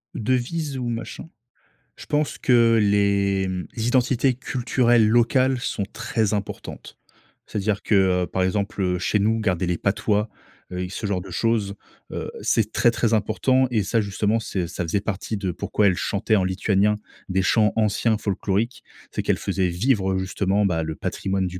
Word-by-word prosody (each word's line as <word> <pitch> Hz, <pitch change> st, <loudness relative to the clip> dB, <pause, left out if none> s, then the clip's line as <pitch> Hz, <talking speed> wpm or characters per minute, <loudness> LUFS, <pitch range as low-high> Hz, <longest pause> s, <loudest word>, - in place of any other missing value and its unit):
Devises 130 Hz, +5 st, -1 dB
ou 125 Hz, -2 st, -3 dB
machin? 115 Hz, +7 st, -6 dB, 0.7 s
Je -, -, -11 dB
pense 150 Hz, 0 st, -1 dB
que 115 Hz, -3 st, +4 dB
les, 100 Hz, -1 st, +2 dB
mmh, 90 Hz, -2 st, -3 dB
les 115 Hz, 0 st, -2 dB
identités 130 Hz, +1 st, +2 dB
culturelles 120 Hz, -3 st, +2 dB
locales 130 Hz, +3 st, +3 dB
sont 100 Hz, -4 st, -2 dB
très 110 Hz, -2 st, -1 dB
importantes. 100 Hz, -1 st, -6 dB, 0.5 s
C'est-à-dire 105 Hz, 0 st, -1 dB
que, 105 Hz, -, +1 dB, 0.3 s
heu, -, -, -12 dB
par 95 Hz, -, -1 dB
exemple, 100 Hz, +3 st, -1 dB
heu, 90 Hz, -1 st, 0 dB
chez 105 Hz, -, +1 dB
nous, 110 Hz, +3 st, +2 dB
garder 95 Hz, -5 st, 0 dB
les 90 Hz, -1 st, 0 dB
patois, 105 Hz, +1 st, 0 dB, 0.4 s
heu, 90 Hz, -, -4 dB
et 90 Hz, -, -5 dB
ce 100 Hz, +2 st, -4 dB
genre 95 Hz, -3 st, -1 dB
de 95 Hz, -, -10 dB
choses, 105 Hz, +1 st, 0 dB, 0.4 s
heu, -, -, -4 dB
c'est 110 Hz, -1 st, +1 dB
très, 120 Hz, -, +3 dB
très 115 Hz, -1 st, 0 dB
important 130 Hz, +5 st, +2 dB
et 110 Hz, -, +2 dB
ça, 115 Hz, +4 st, +1 dB
justement, 105 Hz, +2 st, 0 dB
c'est 95 Hz, -5 st, -3 dB
ça 90 Hz, 0 st, -4 dB
faisait 90 Hz, +5 st, -1 dB
partie 105 Hz, +1 st, -3 dB
de 95 Hz, -2 st, -2 dB
pourquoi 100 Hz, +4 st, 0 dB
elle 90 Hz, -, +3 dB
chantait 110 Hz, +4 st, 0 dB
en 95 Hz, -, +2 dB
lituanien 100 Hz, +2 st, +1 dB, 0.3 s
des 95 Hz, +1 st, +1 dB
chants 105 Hz, +2 st, +3 dB
anciens 110 Hz, +1 st, +1 dB
folkloriques. 100 Hz, +4 st, -2 dB, 0.3 s
C'est -, -, -3 dB
qu'elle -, -, +1 dB
faisait 95 Hz, -2 st, 0 dB
vivre, 95 Hz, +1 st, +1 dB
heu, 95 Hz, -, 0 dB
justement, 95 Hz, +2 st, 0 dB
bah, 80 Hz, -3 st, 0 dB
le 80 Hz, -1 st, -4 dB
patrimoine 95 Hz, +3 st, -2 dB
du 90 Hz, +1 st, -7 dB
105 Hz, 180 wpm, -23 LUFS, 95-115 Hz, 0.7 s, que